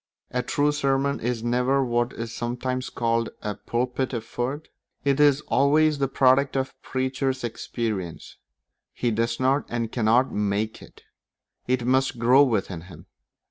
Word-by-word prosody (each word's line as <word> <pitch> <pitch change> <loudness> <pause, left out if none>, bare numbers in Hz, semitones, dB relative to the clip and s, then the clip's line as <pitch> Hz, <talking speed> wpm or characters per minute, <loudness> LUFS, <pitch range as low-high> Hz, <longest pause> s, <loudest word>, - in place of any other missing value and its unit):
A 125 - 0
true 145 +4 +1
sermon 140 -1 0
is 120 -1 -2
never 125 +3 +2
what 120 0 0
is 115 0 -6
sometimes 125 +2 -3
called 115 -1 0
a 105 - -2
pulpit 125 +4 -2
effort; 120 +6 -4 0.4
it 140 0 +2
is 145 -1 +5
always 150 +2 +3
the 135 - +2
product 135 +1 +3
of 130 0 0
the - - -27
preacher's 130 0 -2
experience; 110 -6 -4 0.6
he 120 - -1
does 115 +1 -1
not 135 +3 +2
and 115 -1 -2
cannot 120 +2 +2
make 105 +1 -1
it; - - -16 0.6
it 125 -1 0
must 130 0 +2
grow 125 +4 +5
within 100 -10 +1
him. 85 -2 -13
125 Hz, 145 wpm, -25 LUFS, 115-135 Hz, 0.6 s, is